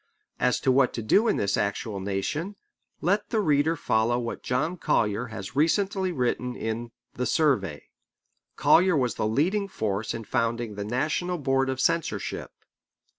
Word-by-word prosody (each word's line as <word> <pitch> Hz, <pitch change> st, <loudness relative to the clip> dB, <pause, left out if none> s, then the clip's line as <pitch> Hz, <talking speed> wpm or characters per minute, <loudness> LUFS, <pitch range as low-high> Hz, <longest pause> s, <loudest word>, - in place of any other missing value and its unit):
As 125 Hz, -, +2 dB
to 135 Hz, -, +3 dB
what 130 Hz, 0 st, +3 dB
to 115 Hz, -, -4 dB
do 205 Hz, -, +4 dB
in -, -, +2 dB
this 100 Hz, 0 st, +1 dB
actual 100 Hz, 0 st, -2 dB
nation, 100 Hz, -, -3 dB, 0.5 s
let 200 Hz, +5 st, +1 dB
the 225 Hz, -, +1 dB
reader 155 Hz, -3 st, +2 dB
follow 120 Hz, -4 st, +1 dB
what 120 Hz, -1 st, -4 dB
John 150 Hz, +8 st, -1 dB
Collier 110 Hz, -, 0 dB
has 110 Hz, -2 st, -8 dB
recently 190 Hz, +5 st, +1 dB
written 125 Hz, -3 st, -1 dB
in 115 Hz, +1 st, -4 dB, 0.2 s
The 125 Hz, -, -2 dB
Survey. 105 Hz, -, +1 dB, 0.7 s
Collier 180 Hz, -1 st, +4 dB
was 125 Hz, -3 st, +1 dB
the 105 Hz, -, -1 dB
leading 180 Hz, -, +1 dB
force 110 Hz, -, -2 dB
in 115 Hz, -, -5 dB
founding 115 Hz, 0 st, -1 dB
the 100 Hz, 0 st, -4 dB
National 155 Hz, +10 st, -1 dB
Board 135 Hz, -2 st, +1 dB
of 130 Hz, -1 st, -2 dB
Censorship. 160 Hz, -, -1 dB
125 Hz, 155 wpm, -26 LUFS, 110-165 Hz, 0.7 s, do